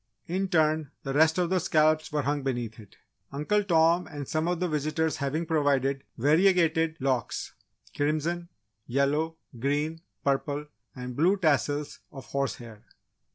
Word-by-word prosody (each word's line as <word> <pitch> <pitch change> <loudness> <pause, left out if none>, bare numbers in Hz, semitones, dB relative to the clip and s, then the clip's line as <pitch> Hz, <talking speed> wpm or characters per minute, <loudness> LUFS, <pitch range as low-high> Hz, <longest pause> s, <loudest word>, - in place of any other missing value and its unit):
In 190 +2 -1
turn, 155 -4 +2
the 135 - -3
rest 160 +3 +4
of 180 -1 +1
the 185 - +3
scalps 155 -1 +2
were 150 -1 0
hung 145 +1 0
beneath 120 -5 -3
it, 105 -3 -15 0.3
Uncle 150 +9 +1
Tom 170 -1 +3
and 145 -2 -7
some 155 +1 -1
of 175 -1 0
the 180 - 0
visitors 155 +1 -1
having 155 +3 -1
provided 140 -4 +1
variegated 160 +2 +3
locks: 130 -3 -1 0.4
crimson, 160 +4 -1 0.4
yellow, 145 +5 0 0.2
green, 150 +5 -1 0.2
purple, 145 +1 0 0.3
and 125 -1 -6
blue 180 +8 +3
tassels 145 -3 0
of 135 -5 -10
horsehair. 120 -4 -4
150 Hz, 140 wpm, -28 LUFS, 140-165 Hz, 0.4 s, rest